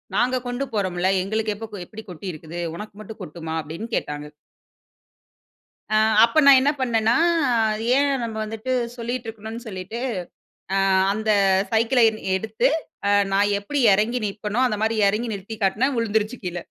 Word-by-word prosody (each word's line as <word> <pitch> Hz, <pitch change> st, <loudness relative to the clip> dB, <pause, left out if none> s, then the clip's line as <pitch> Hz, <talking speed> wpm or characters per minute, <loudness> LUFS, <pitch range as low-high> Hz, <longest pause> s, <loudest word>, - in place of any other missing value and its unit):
நாங்க 255 Hz, +1 st, +2 dB
கொண்டு 245 Hz, +2 st, -2 dB
போறோம்ல. 185 Hz, -3 st, 0 dB
எங்களுக்கு 215 Hz, +3 st, -1 dB
எப்ப 210 Hz, -1 st, -8 dB
எப்டி 220 Hz, +4 st, -10 dB
கொட்டி 180 Hz, +2 st, -8 dB
இருக்குது. 160 Hz, +1 st, -9 dB, 0.2 s
உனக்கு 210 Hz, +4 st, -8 dB
மட்டும் 220 Hz, +1 st, -10 dB
கொட்டுமா 160 Hz, -2 st, -6 dB
அப்டின்னு 160 Hz, +9 st, -7 dB
கேட்டாங்க. 150 Hz, 0 st, -3 dB, 1.7 s
அ. -, -, +4 dB, 0.3 s
அப்ப 235 Hz, +7 st, +1 dB
நான் 275 Hz, -2 st, +9 dB
என்ன 285 Hz, +2 st, +3 dB
பண்ணேன்னா. 230 Hz, -2 st, +2 dB, 0.8 s
ஏன் 285 Hz, +1 st, +3 dB
நம்ம 225 Hz, -1 st, -4 dB
வந்துட்டு 225 Hz, +4 st, -5 dB, 0.3 s
சொல்லிட்டு 240 Hz, 0 st, -4 dB
இருக்கணும்னு 225 Hz, +1 st, -7 dB
சொல்லிட்டு, 195 Hz, +3 st, -6 dB, 0.8 s
அ -, -, +2 dB, 0.3 s
அந்தச் 200 Hz, -3 st, +2 dB
சைக்கிள 230 Hz, +3 st, +3 dB, 0.4 s
எடுத்து 220 Hz, +6 st, 0 dB, 0.4 s
அ -, -, +3 dB, 0.2 s
நான் 200 Hz, +1 st, +3 dB
எப்டி 280 Hz, +9 st, -3 dB
இறங்கி 215 Hz, +5 st, +1 dB
நிப்பனோ 210 Hz, +2 st, -3 dB
அந்த 215 Hz, -4 st, 0 dB
மாரி 220 Hz, +1 st, +1 dB
இறங்கி 215 Hz, +4 st, 0 dB
நிறுத்தி 200 Hz, +2 st, -7 dB
காட்டுனா 210 Hz, +7 st, +2 dB
வறழுந்துருச்சு 220 Hz, 0 st, 0 dB
கீழ. 175 Hz, -1 st, -4 dB
215 Hz, 145 wpm, -23 LUFS, 195-230 Hz, 1.7 s, நான்